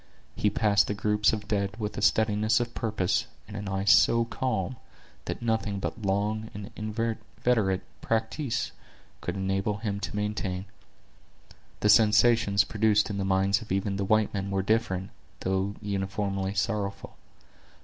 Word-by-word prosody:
He 105 - +2
passed 105 -1 +3
the 105 - -2
groups 105 0 +2
of 105 -1 -4
dead 100 -1 -1
with 105 -2 -4
a - - -4
steadiness 110 +2 +3
of 120 -1 -3
purpose, 105 -5 0 0.2
and 105 - -9
an 100 -1 -4
eye 95 +1 -2
so 115 +4 +5
calm, 130 +1 -2 0.5
that - - -4
nothing 110 -3 0
but 110 - -4
long 105 +2 -1
and 105 -1 -7
inveterate 110 -2 -1 0.2
practise 115 +2 -1 0.5
could - - -3
enable 95 +2 -1
him 105 -2 -3
to 100 - -5
maintain. 105 -3 -2 1.2
The 105 - +3
sensations 105 -2 +5
produced 105 +1 +2
in 100 - -3
the - - 0
minds 95 +2 +2
of 110 - -10
even 100 +1 0
the 100 - -1
white 110 +1 +2
men 100 -1 -2
were 95 -1 0
different, 100 -3 0 0.3
though 95 +2 -1
uniformly 100 -1 -2
sorrowful. 100 -1 -2
105 Hz, 150 wpm, -28 LUFS, 100-110 Hz, 1.2 s, so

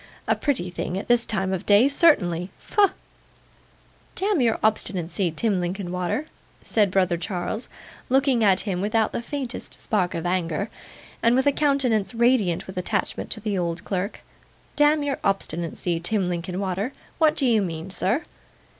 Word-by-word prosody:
A - - +3
pretty 245 - -1
thing 175 +1 -3
at 195 - -5
this 240 -1 +3
time 190 -3 -1
of 185 - -3
day, 205 +5 +5
certainly. 190 - +3
Pho!' 410 -2 +3 1.3
'Damn 395 -5 +1
your 230 -2 +2
obstinacy, 190 -4 0
Tim 190 +5 0
Linkinwater,' 180 - -2 0.4
said 210 -3 +2
brother 185 -2 +2
Charles, 180 +5 -4 0.4
looking 265 -2 +3
at 195 -2 +5
him 190 -3 -2
without 215 +2 +1
the - - -3
faintest 260 0 -6
spark 185 -5 0
of 165 +1 -3
anger, 175 +2 -1 0.5
and 230 +1 +4
with 260 +1 +2
a 285 - +5
countenance 265 -8 +1
radiant 230 -7 +2
with 190 - -10
attachment 180 - -2
to 220 - +1
the 205 -3 -1
old 170 -1 -2
clerk. 195 +2 -3 0.5
'Damn 295 0 +4
your 285 -1 -2
obstinacy, 170 -2 -1
Tim 190 +2 0
Linkinwater, 185 +6 -3 0.3
what 310 -2 +4
do 275 - +1
you 230 -4 +4
mean, 170 0 -4
sir? 205 - 0
200 Hz, 155 wpm, -24 LUFS, 180-245 Hz, 1.3 s, day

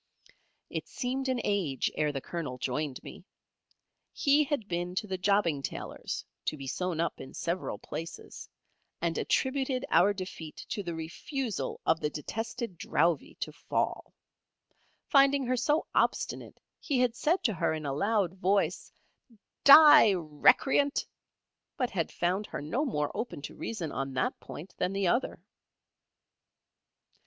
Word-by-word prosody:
It - - -4
seemed 265 +1 -3
an 255 -1 0
age, 180 -10 0
ere 150 -1 0
the 135 -2 -4
Colonel 150 -7 -5
joined 135 +2 -3
me. - - -10 0.9
He 290 +2 +3
had 275 -7 -2
been 175 0 -3
to 200 - -1
the 190 -3 -4
jobbing 185 -7 +2
tailor's - - -5 0.2
to 155 - -1
be 135 - -7
sewn 175 +4 -2
up 170 - -1
in 130 - -10
several 175 +2 -2
places, 165 +1 -8 0.5
and 170 -1 -1
attributed 265 -1 0
our 180 +5 +5
defeat 185 -5 -7
to 205 - -2
the 170 -3 -5
refusal 215 - -4
of 160 - +3
the 150 - -1
detested 225 - -5
Drowvey 165 0 +1
to - - -2
fall. - - -2 0.9
Finding 275 -1 +4
her 255 +1 +1
so 295 +6 +1
obstinate - - 0 0.2
he 280 - -1
had 245 -2 +2
said 330 +8 +1
to 220 - +2
her 170 - 0
in 155 -1 -4
a 140 - -1
loud 200 +3 +1
voice, 190 -2 0 0.7
"Die, 280 -7 +9
recreant!" 185 - +3 0.7
but 250 -3 0
had 170 -4 -1
found 185 +4 -1
her - - -5
no 180 - -1
more 150 - -1
open 225 -11 -5
to - - -6
reason 175 -10 -4
on 135 -1 -4
that 125 - -1
point 170 +6 -9
than 185 - 0
the 195 0 0
other. 240 +8 0
185 Hz, 145 wpm, -30 LUFS, 160-250 Hz, 0.9 s, Die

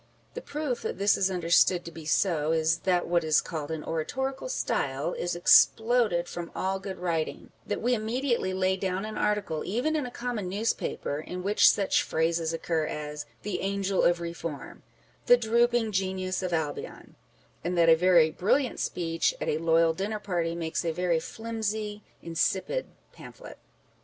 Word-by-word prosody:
The - - -6
proof 290 -5 -3
that - - -4
this 200 +1 +3
is 195 - +1
understood 175 0 +3
to 170 - -7
be 160 -1 -10
so, 160 -3 +1
is, 160 +1 +2
that 180 -2 +1
what 170 0 +2
is 155 -1 +4
called 155 -3 -5
an 160 -1 -4
oratorical 265 - -3
style 140 - -1
is 175 0 -3
exploded 220 0 +4
from 170 -1 -6
all 190 +1 -1
good 190 -1 -6
writing; 165 -3 -3 0.2
that 205 - -3
we 245 +1 +2
immediately 235 -2 -1
lay 185 0 +1
down 190 +1 -2
an 215 0 -6
article, 205 -7 -1
even 250 +11 -1
in 295 -5 -1
a - - -6
common 240 -6 -4
newspaper, 200 -7 -2
in 180 +3 -6
which 205 +2 +5
such 200 -2 +2
phrases 165 0 0
occur 165 -1 -1
as 150 0 -5
" - - -35
the 205 -3 -3
Angel 195 0 0
of 175 - +4
Eeform," 170 -3 -6 0.2
" - - -35
the 245 - +8
drooping 235 0 +2
Genius 190 -1 -1
of 185 -1 -3
Albion 160 -3 -4 0.3
;" - - -35
and 175 +2 -2
that 170 -1 +5
a 165 - +8
very 170 -2 +4
brilliant 240 - 0
speech 165 -2 -1
at - - -2
a 150 - 0
loyal 165 0 +3
dinner 200 +6 -3
party 175 -5 -2
makes 165 0 -2
a 165 - 0
very 175 0 0
flimsy, 215 +1 -4 0.2
insipid 190 - -1 0.3
pamphlet. - - -12
180 Hz, 175 wpm, -28 LUFS, 165-215 Hz, 0.3 s, the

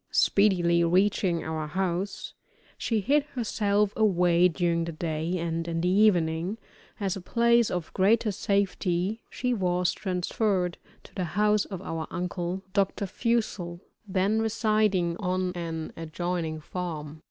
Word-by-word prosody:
Speedily 175 -4 +3
reaching 180 0 +2
our 160 -1 -3
house, 185 +3 -2 0.4
she 225 -3 -1
hid 285 +9 +3
herself 210 -4 +1
away 180 -4 +4
during 170 -1 0
the 170 - -4
day, 160 +2 -2
and 165 -1 -2
in 165 0 -2
the 180 - +1
evening, 180 -2 +2 0.4
as 195 -2 -1
a 195 - -6
place 235 +3 +3
of 175 -3 -4
greater 215 +3 +3
safety, 195 +1 0
she 250 -1 -1
was 180 -4 +1
transferred 185 -1 -1 0.2
to - - -16
the 185 - -2
house 210 0 +3
of 190 -2 -7
our 165 -3 -4
uncle, 180 +1 -3
Dr. 200 0 +1
Fussell, 200 -5 -1 0.3
then 195 +3 +1
residing 215 -6 +1
on 185 -1 -1
an 165 -2 -5
adjoining 165 0 -3
farm. 155 -3 -5
180 Hz, 130 wpm, -27 LUFS, 170-205 Hz, 0.4 s, away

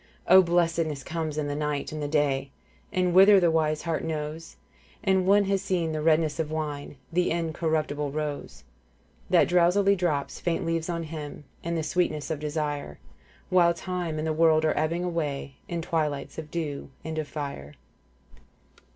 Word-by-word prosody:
* - - -31
O 190 - +10
blessedness 165 -4 +1
comes 160 -3 -3
in 150 - 0
the 145 - -2
night 150 -1 -2
and 155 0 -5
the 145 - -1
day 140 -2 +1 0.4
'And 180 -1 +1
whither 195 +2 +8
the 175 -2 +3
wise 155 -1 +1
heart 165 -2 -2
knows; 155 0 -4 0.3
' - - -29
And 190 -2 +2
one 200 +1 +6
has 195 -1 0
seen 175 -4 0
in - - -2
the 155 -1 -2
redness 155 0 +2
of 160 -2 -1
wine 150 -2 -4
' 125 - -25
The 180 +1 +2
Incorruptible 160 -3 -1
Rose, 150 -1 -5 0.3
* - - -33
That - - +5
drowsily 180 +3 +4
drops 160 -6 -1
faint 170 -1 -1
leaves 165 0 -1
on 170 -1 -2
him 150 -2 -7
* - - -33
And 170 0 -2
the 160 - -1
sweetness 155 -3 -1
of 155 - -2
desire, 150 - -3 0.3
' - - -30
While 170 -2 +5
time 175 -3 -3
and 155 - -2
the 160 - 0
world 160 0 +4
are 155 - +2
ebbing 165 +3 0
away 150 -6 -3
' - - -35
In 170 -1 -3
twilights 155 -4 -2
of 155 -1 -8
dew 150 -4 -4 0.2
and 160 0 -3
of 155 - -3
fire. 140 - -6
160 Hz, 195 wpm, -27 LUFS, 150-170 Hz, 0.4 s, O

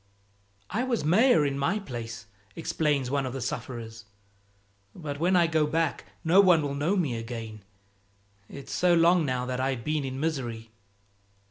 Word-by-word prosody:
"I 220 +6 0
was 240 - -1
mayor 185 - +4
in 140 -1 -1
my 165 +9 +1
place," 115 - -7 0.3
explains 145 -5 -1
one 140 -2 0
of 125 - -5
the 135 - -4
sufferers, 120 -3 -6 0.9
"but 145 -4 -6
when 180 +3 +2
I 175 -1 +5
go 160 -2 +1
back 160 0 -1 0.2
no 180 +4 +6
one 175 -5 +5
will 140 -1 -2
know 155 +8 0
me 150 -10 0
again, 115 -2 -6 0.9
it's 140 -1 -9
so 180 -1 +3
long 170 -1 +4
now 125 -1 -1
that 125 0 -3
I've 130 -2 -1
been 150 +1 -1
in 130 0 -4
misery." 120 -8 -3
145 Hz, 160 wpm, -27 LUFS, 125-165 Hz, 0.9 s, no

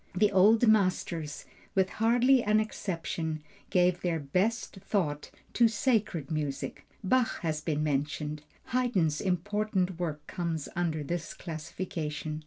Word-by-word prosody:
The 205 +2 +4
old 215 +5 +5
masters 185 -7 +1 0.3
with 190 0 +2
hardly 245 +3 +5
an 215 -1 +3
exception 165 -7 -3 0.3
gave 180 -1 +3
their 170 -2 0
best 190 +11 -1
thought 180 -7 -1 0.2
to 235 - +5
sacred 215 - 0
music. 150 -3 -3 0.2
Bach 245 +5 +2
has 155 -3 -1
been 155 -1 -1
mentioned. 150 +1 -1 0.3
Haydn's 200 -12 +1
important 190 0 0
work 155 -4 -3
comes 165 -4 -3
under 165 -4 -1
this 170 +2 -4
classification. 155 -2 -5
175 Hz, 120 wpm, -30 LUFS, 155-210 Hz, 0.3 s, old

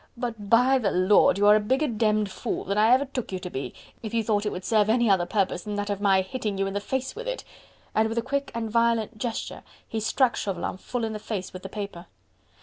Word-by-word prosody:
But, 225 -4 -5
by 250 +4 +5
the 210 -5 +1
Lord, 185 +2 +4
you 205 - +2
are 210 0 +8
a - - +4
bigger 260 +8 +1
demmed 215 -3 +1
fool - - -3
than 200 +2 0
ever 245 +5 +5
I - - -9
took 250 -6 -3
you 190 - -2
to 180 -1 -7
be, 135 - -4 0.3
if 220 0 -5
you 225 - +2
thought 210 -1 0
it - - -1
would 180 - -6
serve 215 -2 +3
any 235 +1 +3
other 175 -3 +2
purpose 195 -2 0
save 210 +3 -5
that 205 0 -2
of 200 0 -3
my 195 -2 +4
hitting 205 0 -4
you 195 - 0
in 195 - -3
the 200 - -1
face 260 +5 -3
with 480 +3 -7
it." - - -3 0.5
And 220 +1 +2
with 225 - -4
a 235 - +1
quick 280 +2 -2
and 230 -1 -2
violent 230 -1 +1
gesture 230 0 -4 0.3
he 225 - -3
struck 240 +3 +2
Chauvelin 185 -2 -3
full 245 +5 -4
in 220 -1 -2
the 215 - -5
face 200 -3 -5
with 185 - -8
the 195 - -7
paper. 200 -4 -7
215 Hz, 255 wpm, -26 LUFS, 200-235 Hz, 0.5 s, are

